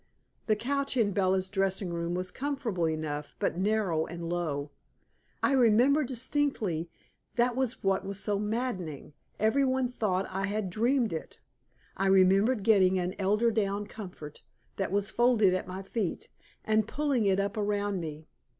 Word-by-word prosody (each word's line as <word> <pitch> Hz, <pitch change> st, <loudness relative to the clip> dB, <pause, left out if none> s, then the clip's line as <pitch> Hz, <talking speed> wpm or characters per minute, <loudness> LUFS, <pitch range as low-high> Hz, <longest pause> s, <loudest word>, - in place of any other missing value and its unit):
The 215 Hz, -, +4 dB
couch 275 Hz, +4 st, -1 dB
in 215 Hz, -4 st, +3 dB
Bella's 190 Hz, -1 st, +1 dB
dressing 195 Hz, -2 st, -1 dB
room 170 Hz, +1 st, -2 dB
was 185 Hz, 0 st, -3 dB
comfortable 240 Hz, -, -1 dB
enough, 150 Hz, -2 st, -4 dB
but 175 Hz, -, -1 dB
narrow 190 Hz, -6 st, +1 dB
and 170 Hz, 0 st, -6 dB
low. 155 Hz, -4 st, -2 dB, 0.7 s
I -, -, +3 dB
remember 260 Hz, +3 st, +4 dB
distinctly 240 Hz, -, -1 dB, 0.5 s
(that 240 Hz, 0 st, +2 dB
was 260 Hz, -2 st, -2 dB
what 195 Hz, -1 st, +1 dB
was 195 Hz, 0 st, -4 dB
so 205 Hz, -1 st, -1 dB
maddening; 210 Hz, -, -3 dB, 0.3 s
everybody 260 Hz, +3 st, +2 dB
thought 195 Hz, -6 st, -1 dB
I 195 Hz, +3 st, -1 dB
dreamed 225 Hz, +3 st, +1 dB
it) 160 Hz, -, -6 dB, 0.6 s
I 195 Hz, -, 0 dB
remember 195 Hz, +5 st, +5 dB
getting 195 Hz, -4 st, +4 dB
an 180 Hz, 0 st, -1 dB
eiderdown 210 Hz, 0 st, +1 dB
comfort 180 Hz, -8 st, -9 dB, 0.4 s
that 195 Hz, -2 st, -2 dB
was 205 Hz, +1 st, 0 dB
folded 235 Hz, -6 st, +4 dB
at 185 Hz, -, -2 dB
my 185 Hz, +1 st, -6 dB
feet, 195 Hz, -2 st, -3 dB, 0.4 s
and 215 Hz, 0 st, +2 dB
pulling 275 Hz, -4 st, 0 dB
it 195 Hz, -1 st, +3 dB
up 200 Hz, +3 st, -1 dB
around 205 Hz, -2 st, -1 dB
me. 155 Hz, -2 st, -6 dB
200 Hz, 145 wpm, -29 LUFS, 185-235 Hz, 0.7 s, remember